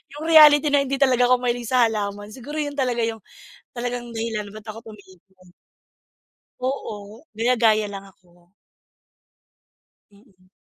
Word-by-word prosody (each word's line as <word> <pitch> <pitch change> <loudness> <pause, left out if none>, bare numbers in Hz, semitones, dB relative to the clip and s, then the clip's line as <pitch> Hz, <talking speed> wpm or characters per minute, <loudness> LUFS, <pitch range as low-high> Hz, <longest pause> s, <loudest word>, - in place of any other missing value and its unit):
yung 295 - -8
reality 300 -2 +7
na 285 - +4
hindi 275 - -1
talaga 255 -3 +3
ako 255 - +5
mahilig 240 -1 -2
sa 250 +1 +3
halaman. 205 -1 -5
Siguro 265 +6 -9
yun 295 -2 -2
talaga 250 -4 -1
yung 225 0 -3 0.5
talagang 240 -1 -5
dahilan 225 -3 -4
ba't 215 +1 -12
ako 225 +1 -9
tumigil. 190 -2 -20 1.1
Oo, 220 -3 -5
gaya-gaya 225 -2 +2
lang 195 -1 -8
ako. 175 -2 -28 1.6
Mm. 200 -3 -25
230 Hz, 130 wpm, -22 LUFS, 205-255 Hz, 1.6 s, reality